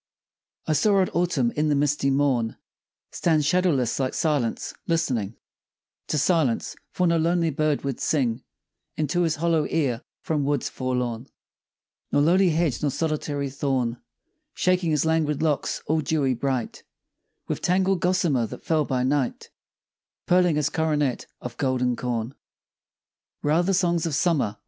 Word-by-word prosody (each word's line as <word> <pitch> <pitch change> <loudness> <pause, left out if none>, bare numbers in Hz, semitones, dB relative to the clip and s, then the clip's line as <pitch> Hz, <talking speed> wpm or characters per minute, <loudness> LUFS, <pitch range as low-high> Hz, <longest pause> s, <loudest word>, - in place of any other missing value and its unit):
I 155 - +1
saw 200 +7 +3
old 190 -1 +2
Autumn 165 -9 +1
in 150 +1 +1
the 145 - +2
misty 145 -1 +1
morn 135 -5 +1 0.5
Stand 155 -3 +1
shadowless 150 -9 +1
like 130 -1 -1
Silence, 145 -8 -1
listening 120 - 0 0.7
To 150 - -1
silence, 150 -5 +1 0.2
for 180 - 0
no 170 -1 +3
lonely 165 0 +1
bird 150 0 0
would 135 -3 -3
sing 125 -5 0 0.6
Into 155 +3 0
his 165 -2 +1
hollow 160 -1 +1
ear 130 -7 0 0.2
from 150 -3 0
woods 140 -2 0
forlorn, 125 -1 -3 0.8
Nor 145 - +3
lowly 180 +4 +4
hedge 160 -5 0
nor 150 - +1
solitary 145 -2 -2
thorn; 130 -4 -1 0.5
Shaking 180 -2 +1
his 150 -1 +1
languid 160 -2 +1
locks 150 -3 -1
all 155 +1 +1
dewy 140 -3 +1
bright 130 -1 -2 0.7
With - - -3
tangled 185 +1 +2
gossamer 170 -10 +1
that - - -10
fell 155 -2 +2
by 130 -2 -1
night, 135 0 -1 0.7
Pearling 180 -2 +3
his 150 -2 0
coronet 150 -5 0
of 125 -1 -7
golden 125 -2 0
corn. 120 0 -3 1.1
Where 145 - +1
are 165 - +4
the 190 +2 +1
songs 175 -3 +1
of 155 - -1
Summer? 145 - +1
150 Hz, 145 wpm, -25 LUFS, 130-165 Hz, 1.1 s, lowly